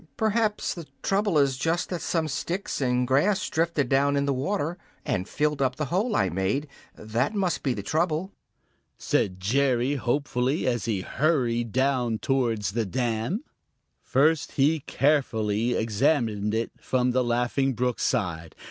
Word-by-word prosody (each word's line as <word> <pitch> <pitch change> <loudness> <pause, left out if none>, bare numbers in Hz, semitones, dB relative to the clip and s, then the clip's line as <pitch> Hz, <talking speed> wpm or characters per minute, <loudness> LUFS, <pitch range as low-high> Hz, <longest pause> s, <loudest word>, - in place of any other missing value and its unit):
"Perhaps 220 -1 +1
the 170 -4 -9 0.2
trouble 195 -3 +1
is 140 -3 +3
just 165 +4 0
that 180 -2 -3
some 165 -2 0
sticks 170 +5 -3
and 125 -1 +1
grass 185 +10 +2
drifted 160 -4 +1
down 140 +2 +2
in 140 - +1
the 140 - +1
water 165 +5 -2 0.3
and 95 -1 -2
filled 150 -1 0
up 130 -2 +1
the 150 - -2
hole 210 +4 +1
I - - +3
made; 95 - -1 0.3
that 120 - -2
must 190 -4 0
be 130 -4 0
the - - -5
trouble," 160 +4 0 0.7
said 95 -1 0
Jerry 125 +5 +1
hopefully, 130 +2 0
as 120 -5 0
he 105 -5 -1
hurried 120 - 0 0.5
towards 115 -8 0
the 115 0 -1
dam. 120 - -1 0.6
First 150 +4 +2
he 150 +4 +3
carefully 120 -6 +1
examined 110 -2 +1
it 115 +1 -1
from 125 -1 +1
the 130 +1 +2
Laughing 125 +3 +1
Brook 125 +1 -1
side. 85 -9 -1
135 Hz, 150 wpm, -26 LUFS, 115-155 Hz, 0.7 s, is